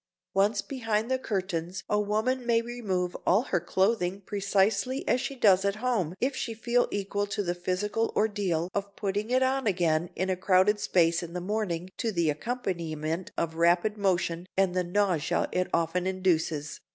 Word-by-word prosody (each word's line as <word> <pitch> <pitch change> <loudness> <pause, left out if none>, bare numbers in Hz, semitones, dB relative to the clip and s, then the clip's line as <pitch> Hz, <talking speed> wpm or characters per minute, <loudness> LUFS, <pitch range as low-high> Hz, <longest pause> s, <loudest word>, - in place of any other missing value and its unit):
Once 200 +1 +2
behind 225 -3 -2
the 260 - +2
curtains 185 -5 -3
a 210 - +1
woman 220 +5 0
may 235 -1 +3
remove 205 -7 -2
all 200 +7 +3
her 185 -9 0
clothing 190 +2 0
precisely 200 +5 0
as 250 - +2
she 275 - -4
does 195 -6 +4
at 200 0 +1
home 215 -8 -1
if 265 +2 0
she 230 -3 -3
feel 240 +2 +1
equal 205 0 -2
to 205 +1 -2
the 175 -2 -1
physical 190 +5 -1
ordeal 200 -6 0
of 200 0 -3
putting 205 +2 -2
it 255 +1 +3
on 265 -1 +1
again 170 -3 +1
in 185 - -1
a 185 - +1
crowded 190 +3 +3
space 170 -3 +2
in 170 -1 -7
the 180 - -2
morning 185 -3 -2
to 230 - -1
the 170 -5 +1
accompaniment 170 -4 -3
of 165 -1 -1
rapid 175 +5 +3
motion 180 -3 0
and 190 -2 +3
the 180 0 +1
nausea 180 -3 +1
it 185 0 0
often 170 +2 0
induces. 165 -6 0
195 Hz, 175 wpm, -28 LUFS, 175-215 Hz, -, does